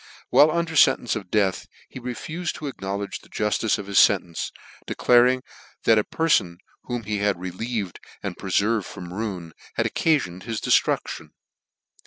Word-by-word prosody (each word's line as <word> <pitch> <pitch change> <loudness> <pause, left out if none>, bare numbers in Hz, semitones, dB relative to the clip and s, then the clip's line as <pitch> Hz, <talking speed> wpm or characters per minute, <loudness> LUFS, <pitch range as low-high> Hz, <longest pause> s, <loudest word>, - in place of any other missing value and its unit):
While 150 - +7
under 165 0 -1
fentence 130 -5 +4
of 100 -4 -6
death 100 -3 +1 0.2
he - - -9
refufed 155 +8 -4
to 155 - -8
ac 140 - -5
knowledge 100 +1 -3
the - - -20
juftice 105 +1 0
of 105 - -6
his 100 0 +6
fentence, 90 -4 0 0.4
declaring 125 +1 +4 0.4
that 110 -1 +5
a - - +1
perfon 100 - +1 0.3
whom 120 -2 -3
he 105 0 -2
had 100 -3 +1
relieved, 95 +2 -4 0.2
and - - -3
pre - - -7
ferved 105 0 +2
from 90 0 -8
ruin, 95 -6 -4 0.2
had - - +1
occafiond 115 - +1
his 110 +1 -4
cieftruclion. - - 0
105 Hz, 160 wpm, -24 LUFS, 95-125 Hz, 0.4 s, While